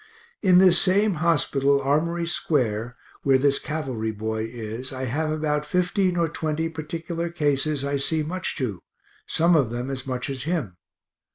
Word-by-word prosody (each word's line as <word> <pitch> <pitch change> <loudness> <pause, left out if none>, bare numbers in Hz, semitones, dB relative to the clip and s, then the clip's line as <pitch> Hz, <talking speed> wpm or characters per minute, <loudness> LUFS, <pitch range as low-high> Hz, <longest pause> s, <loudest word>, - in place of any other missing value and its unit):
In 185 -3 +5
this 180 -1 +6
same 200 +2 +3
hospital, 140 -4 +2
Armory 160 +5 0
square, 125 -8 -1 0.2
where 135 -1 +4
this 140 +1 +3
cavalry 130 -8 -3
boy 110 +1 -3
is, 115 +2 -6
I 130 0 -5
have 150 +6 -1
about 150 -1 0
fifteen 180 +3 +1
or 170 -1 +2
twenty 160 0 -2
particular 165 +2 -4
cases 145 -3 0
I 140 0 0
see 155 +3 0
much 180 +4 -2
to 110 - -3 0.5
some 170 +2 +3
of 135 -7 +3
them 120 +3 -4
as 135 0 -5
much 125 -1 -2
as 135 -1 -4
him. 150 - -2
150 Hz, 160 wpm, -24 LUFS, 130-165 Hz, 0.5 s, this